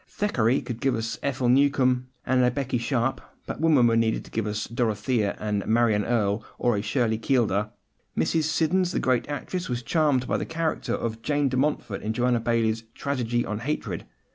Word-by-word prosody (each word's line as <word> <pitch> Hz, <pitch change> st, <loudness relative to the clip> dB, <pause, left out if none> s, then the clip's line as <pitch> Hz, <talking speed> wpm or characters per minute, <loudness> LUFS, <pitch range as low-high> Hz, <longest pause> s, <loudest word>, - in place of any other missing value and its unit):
Thackeray 130 Hz, -, +1 dB
could 120 Hz, -2 st, -6 dB
give 135 Hz, -, +2 dB
us 115 Hz, +1 st, -3 dB
an -, -, -10 dB
Ethel 130 Hz, -2 st, -1 dB
Newcome 130 Hz, -1 st, +3 dB, 0.2 s
and 130 Hz, -1 st, +3 dB
a 125 Hz, -, +5 dB
Becky 130 Hz, -1 st, -2 dB
Sharp, 120 Hz, +1 st, 0 dB, 0.2 s
but -, -, -5 dB
women 155 Hz, -7 st, +5 dB
were 115 Hz, -1 st, +4 dB
needed 115 Hz, -1 st, +1 dB
to -, -, -15 dB
give 110 Hz, -1 st, -1 dB
us 105 Hz, 0 st, -2 dB
a -, -, -14 dB
Dorothea, 110 Hz, -2 st, 0 dB
a 105 Hz, -, -3 dB, 0.2 s
Marion 110 Hz, -2 st, +3 dB
Erle, 110 Hz, -3 st, +1 dB
or 120 Hz, -2 st, +2 dB
a 100 Hz, -, -1 dB
Shirley 110 Hz, 0 st, 0 dB
Keeldar. 110 Hz, -5 st, +1 dB, 0.5 s
Mrs. 160 Hz, -2 st, +1 dB
Siddons, 170 Hz, +3 st, +1 dB
the -, -, +1 dB
great 130 Hz, +1 st, +1 dB
actress, 175 Hz, +4 st, -4 dB
was 120 Hz, -1 st, -2 dB
charmed 145 Hz, -4 st, +2 dB
by -, -, 0 dB
the -, -, -2 dB
character 165 Hz, 0 st, -1 dB
of 115 Hz, -1 st, -4 dB
Jane 145 Hz, +1 st, +1 dB
de 130 Hz, -, -1 dB
Montfort 135 Hz, -7 st, -1 dB
in 110 Hz, -, -2 dB
Joanna 125 Hz, 0 st, +2 dB
Baillie's 115 Hz, -1 st, 0 dB
Tragedy 120 Hz, -4 st, -1 dB
on 105 Hz, 0 st, -3 dB
Hatred. 145 Hz, +6 st, -3 dB
120 Hz, 195 wpm, -26 LUFS, 115-140 Hz, 0.5 s, a